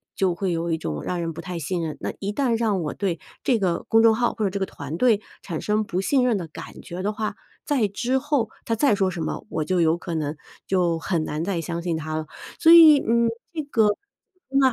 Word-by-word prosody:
就 190 -2 +1
会 185 +1 -2
有 170 0 -2
一 160 - +1
种 75 - -4
让 180 - -2
人 165 -1 -3
不 165 - -7
太 180 -1 -5
信 170 +3 -2
任 155 -2 -4
那 - - -4
一 200 0 -2
旦 235 +1 +1
让 215 -5 +1
我 150 - -3
对 185 -5 -2 0.2
这 240 -4 +2
个 180 -4 0
公 225 0 +5
众 225 -1 +6
号 240 +1 +1
或 220 - -2
者 - - +2
这 195 - -4
个 190 - 0
团 145 -3 -7
队 220 -1 +3 0.2
产 165 -5 -5
生 215 +1 +1
不 185 -3 -3
信 255 +5 +2
任 240 -4 +2
的 175 -4 -5
感 155 - -10
觉 180 +2 -7
的 205 - 0
话， 215 -1 -3 0.3
再 260 -8 +2
之 240 +6 0
后 270 -5 0 0.2
它 230 - 0
再 245 0 +3
说 190 -2 +1
什 175 - -5
么， 155 - -4
我 155 - -2
就 185 0 +1
有 165 0 +3
可 170 -1 -5
能 150 -1 -2 0.3
就 175 -3 +1
很 165 -1 -1
难 150 +1 -3
再 185 -1 -1
相 170 +1 -4
信 170 -2 -1
它 155 0 -4
了。 155 0 -2 0.3
所 325 - +6
以， 315 -4 +9
嗯 235 0 +2 0.3
这 320 - -2
个 230 -7 +2 0.6
那 270 -1 +4
190 Hz, 265 characters per minute, -24 LUFS, 165-230 Hz, 0.6 s, 以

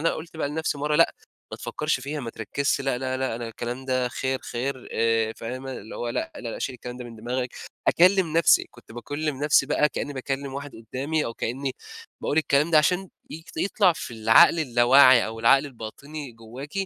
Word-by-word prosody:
أنا 165 - +2
قُلت 165 +1 -9
بقى 155 - -1
لنفسي 150 0 -2
مرة 150 +1 0
لأ، 165 - +5 0.4
ما - - -6
تفكّرش 150 -3 -2
فيها، 145 +3 -4
ما 120 -3 -5
تركّزش 140 +6 -1
لأ، 135 -2 -1
لأ، 130 0 -2
لأ 130 -3 -2
أنا 120 -1 -5
الكلام 120 +3 -5
ده 130 -1 0
خير، 130 +1 -2
خير 130 +2 -4
آآ 115 -1 +1
فاهمة، 130 +3 -6
اللي 110 -3 -8
هو 120 - -3
لأ، 325 - -3
لأ، - - -7
لأ - - -6
شيل 130 - -3
الكلام 125 0 -8
ده 125 - -8
من 115 -1 -10
دماغك. 125 +3 -3 0.4
أكلّم 180 -1 +4
نفسي، 165 - +5
كنت 120 -2 -16
باكلّم 145 +5 -3
نفسي 145 -2 +4
بقى 150 +2 +2
كإني 145 - -4
باكلّم 135 0 -4
واحد 140 0 -6 0.2
قدامي، 150 +4 -1
أو 115 - -5
كإني 130 +4 -3 0.5
باقول 145 - 0
الكلام 150 0 +2
ده 160 - +6
عشان 180 +5 +1 0.2
ي 160 +1 -8
يطلع 200 -2 +3
في 125 - -7
العقل 115 +10 +6
اللاوعي 130 -2 +6
أو 110 0 -7
العقل 135 +5 +5
الباطني 140 +3 -8
جواكِ، 115 +5 -10
135 Hz, 200 wpm, -25 LUFS, 120-150 Hz, 0.5 s, ده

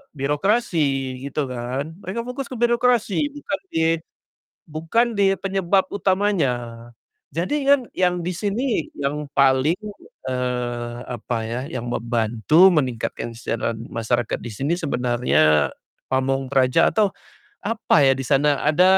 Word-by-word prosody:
birokrasi 145 - 0
gitu 140 0 -2
kan. 130 +6 -4
Mereka 190 +5 -4
fokus 255 +1 -4
ke - - -4
birokrasi 240 +2 +2
bukan 290 0 -4
di 160 - +1 0.9
bukan 165 +10 +1
di 200 - +4
penyebab 195 0 +1
utamanya. 190 -8 +1 0.8
Jadi 180 - -1
kan 280 -1 +6 0.2
yang 180 -1 +2
di 170 - -3
sini 210 - -1
yang 145 +1 -2
paling, 135 +4 +3 0.5
eee, 120 -2 -2
apa 120 0 -3
ya, 120 +2 -3
yang 120 -5 -5
membantu 120 - +3
meningkatkan 125 -7 -1
kesejahteraan 115 -1 -3
masyarakat 115 0 -1
di 120 - -7
sini 140 +10 -1
sebenarnya 120 - +2 0.4
pamong 135 0 0
praja 130 -2 +4
atau 210 -2 +3 0.5
apa 215 -8 +2
ya 135 - +6
di 135 - -4
sana, 140 +1 +2
ada 155 +4 +4
145 Hz, 125 wpm, -22 LUFS, 125-190 Hz, 0.9 s, kan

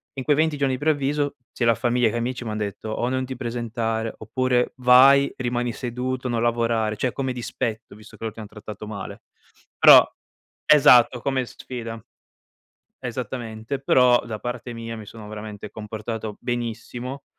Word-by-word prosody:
In 130 - -4
quei 145 - +3
20 155 0 +1
giorni 140 -2 +1
di 130 - -8
preavviso, 145 -1 0 0.2
sia 120 - -1
la 115 - +5
famiglia 120 0 +2
che 120 - -5
amici, 125 +1 -3
m'han 110 -1 -3
detto, 105 +1 -4
o: 120 +2 -1
"Non 130 0 -1
ti 130 +1 -6
presentare." 115 -2 -3
Oppure: 125 +3 0
"Vai, 130 +2 +6
rimani 120 -1 -1
seduto, 125 +1 -3
non 115 -1 0
lavorare, 115 -2 +1
cioè 125 +3 0
come 130 -2 -2
dispetto 115 -3 -4
visto 110 0 -15
che - - -11
loro 110 - -3
ti 115 - -8
han 105 - -8
trattato 105 0 -9
male." 100 -3 -7 0.6
Però - - +10 0.6
Esatto 125 -4 +6
come 130 -2 0
sfida. 115 -2 -7 1.0
Esattamente, 120 -1 -5
però 125 -2 +5
da 110 -2 -5
parte 120 0 -5
mia 115 0 -6
mi 110 -2 -9
sono 110 -1 -11
veramente 105 -1 -8
comportato 110 0 -6
benissimo, 120 +2 -4
120 Hz, 160 wpm, -23 LUFS, 110-130 Hz, 1.0 s, Però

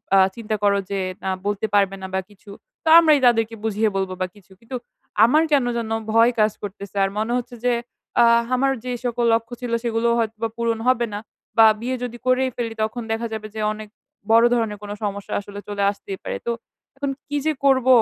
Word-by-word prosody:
আ - - +7 0.2
চিন্তা 220 -2 -3
করো 200 0 +4
যে 195 - -1 0.2
না 190 - -1 0.2
বলতে 205 +1 -1
পারবে 195 -1 +3
না 190 - -5
বা 190 - +1
কিছু, 200 0 -15 0.3
তো 320 - +1
আমরাই 310 -4 +5
তাদেরকে 225 -1 +2
বুঝিয়ে 220 0 +1
বলব 190 -1 -1
বা 185 - +1
কিছু।" 195 -2 -20
কিন্তু, 250 +2 -6 0.5
আমার 305 +7 +4
কেন 275 -4 +4
যেন 225 -1 -3 0.2
ভয় 230 +2 +6
কাজ 215 0 +4
করতেছে 200 0 -7
আর 195 - +2
মনে 225 +3 -1
হচ্ছে 245 0 -5
যে 245 - +4 0.5
আ - - +7 0.2
আমার 270 +2 +2
যেই 250 -1 -3
সকল 240 0 0
লক্ষ্য 230 +1 -1
ছিল 245 -1 -4
সেগুলোও 235 0 +1
হয়তোবা 225 0 -2
পূরণ 230 -1 0
হবে 240 -2 +2
না। - - -3 0.4
বা 225 - +9 0.2
বিয়ে 255 +2 -1
যদি 240 -1 -5
করেই 255 +1 +3
ফেলি 230 -2 -3
তখন 225 +2 -3
দেখা 230 +1 -1
যাবে 215 -1 -5
যে 215 - -3
অনেক, 215 0 -9 0.4
বড় 230 +1 +7
ধরনের 225 -3 0
কোন 205 - -6
সমস্যা 200 -1 -4
আসলে 200 0 -9
চলে 200 -1 -2
আসতেই 195 -1 -8
পারে। - - -3
তো, 235 - 0 0.5
এখন 280 0 -2 0.2
কি 290 0 -2
যে 310 - +2
করব? 260 -2 +4
225 Hz, 205 wpm, -22 LUFS, 205-245 Hz, 0.5 s, বা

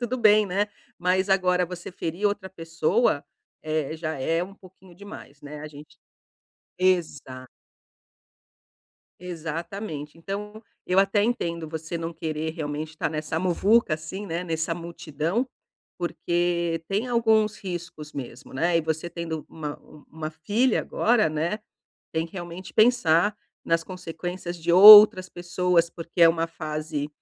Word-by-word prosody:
tudo 245 +1 -2
bem, 215 -3 +5
né? 200 +3 0 0.3
Mas 185 +2 +1
agora 180 -2 +2
você 175 0 -8
ferir 180 +1 -5
outra 200 -2 -2
pessoa 170 - 0 0.4
é 155 -1 -2
já 160 -2 -4
é 165 +5 0
um 195 +2 -8
pouquinho 185 -2 -18
demais, 180 -7 -12
né. 145 +1 -9
A 155 - -7
gente 150 0 -14 0.8
exato. 155 -8 -1 1.7
Exatamente. 165 -1 -6
Então, 210 +5 -7 0.2
eu 185 +1 +2
até 195 +1 +2
entendo 170 -9 -2
você 160 +1 -5
não 165 0 -4
querer 160 0 -3
realmente 155 -1 -5
estar 160 -1 -3
nessa 155 +1 -3
muvuca 185 +2 +2
assim, 160 +6 -7
né, 170 +1 -3
nessa 160 0 -2
multidão, 170 - -3 0.5
porque 170 -1 -1
tem 210 +6 -1
alguns 220 -3 +2
riscos 175 -5 -7
mesmo, 130 -1 -8
né. 170 +4 +1
E - - +3
você 160 +2 -3
tendo 165 -2 -5
uma-u 150 -1 -9
uma 155 0 -6
filha 210 +10 +1
agora, 220 -6 +2
né, 165 +7 -2 0.5
tem 160 0 -1
que 165 - -17
realmente 175 0 -8
pensar 210 -5 +4 0.3
nas 165 0 +1
consequências 175 0 -6
de 170 +1 -1
outras 205 0 +10
pessoas, 175 -1 0
porque 170 +1 -5
é 165 - +8
uma 165 0 0
fase 155 -2 -4
170 Hz, 135 wpm, -25 LUFS, 160-190 Hz, 1.7 s, outras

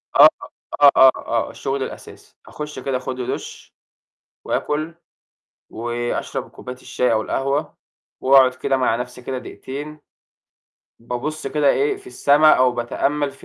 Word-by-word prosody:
آه، - - +10 0.5
آه، 145 -1 +9
آه، 130 - +8
آه، 115 -1 -2
الشغل 135 0 -3
الأساسي، - - -10
أخُشّ 150 -2 -7
كده 130 0 -2
آخد 130 0 -6
لي 125 - -3
دُشّ، - - -9 0.7
وآكل، 155 +2 -2 0.7
وأشرب 120 +1 -4
كوباية 125 - -9
الشاي 125 -1 -1
أو 110 -1 +2
القهوة، 135 +6 -2 0.4
وأقعد 130 -1 +6
كده 135 +1 0
مع 125 -3 +1
نفْسي 125 +1 -6
كده 130 +1 -4
دقيقتين، 145 +4 -8 1.0
بابُصّ 125 +6 -5
كده 145 +1 +1
إيه، 420 -1 +1
في 395 0 -17
السما 155 - +4
أو 130 -1 +4
باتأمَّل 140 +4 -1
في - - -17
135 Hz, 140 wpm, -21 LUFS, 125-150 Hz, 1.0 s, آه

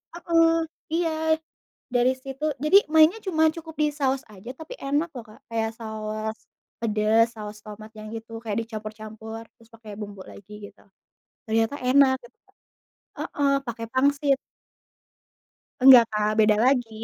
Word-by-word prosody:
mhm, 330 -1 +2 0.3
iya 320 -1 +1 0.6
dari 245 +1 +3
situ. 270 +3 -5
Jadi 305 +7 +4
mainnya 320 +7 +5
cuma 320 -4 +2
cukup 320 -1 -10
di 300 -1 +2
saus 270 -2 -1
aja 205 +4 -11
tapi 320 +9 -9
enak 290 +5 0
loh, 245 -3 -7
Kak. - - -20
Kayak 225 -1 -1
saus 220 0 -5 0.4
pedes, 220 0 +3
saus 210 0 -8
tomat 215 0 -10
yang 215 0 -9
gitu. 225 0 -8
Kayak 225 +1 -2
dicampur-campur 220 0 -8 0.2
terus 230 0 -21
pakai 220 -2 -12
bumbu 200 -2 -8
lagi 205 +1 -13 0.2
gitu - - -25 0.7
ternyata 225 +5 +1
enak 260 +1 +4
gitu. 240 +1 -18 0.8
Heeh, 280 -1 0
pakai 230 0 -5
pangsit. 280 +1 +2 1.4
Nggak, 255 -2 +9
Kak, 210 0 0
beda 215 -1 +5
lagi. 250 -4 +2
235 Hz, 135 wpm, -25 LUFS, 220-295 Hz, 1.4 s, Nggak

